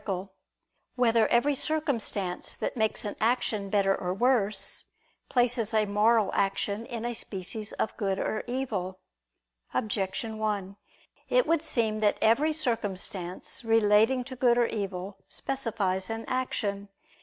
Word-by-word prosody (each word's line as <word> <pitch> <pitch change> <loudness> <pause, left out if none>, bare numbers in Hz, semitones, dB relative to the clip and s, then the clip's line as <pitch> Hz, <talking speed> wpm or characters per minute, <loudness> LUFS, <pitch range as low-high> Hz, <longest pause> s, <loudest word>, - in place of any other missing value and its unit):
11] 190 0 -3 0.7
Whether 230 -3 +4
Every 275 +5 +3
Circumstance 255 - -2
That - - -3
Makes 220 -2 0
an 205 - -3
Action 220 -3 +1
Better 195 -1 +3
or 180 0 -3
Worse, 225 -2 +2 0.4
Places 240 -3 +2
a 215 -1 +4
Moral 210 +1 +3
Action 200 +3 0
in 235 -3 -4
a 240 - -1
Species 210 0 -5
of - - -2
Good 195 -2 0
or 215 - -2
Evil? 215 -8 -3 0.8
Objection 215 +2 -2
1: 200 -3 -2 0.5
It - - +4
would 330 -1 +2
seem 220 -8 0
that 210 -1 +2
every 270 +8 +4
circumstance 205 - -2
relating 225 +2 +4
to 260 +1 -8
good 245 -1 +3
or 240 - +4
evil, 195 -3 -4
specifies 210 -8 -2
an 225 0 -4
action. 205 -6 -2
220 Hz, 130 wpm, -28 LUFS, 200-240 Hz, 0.8 s, Whether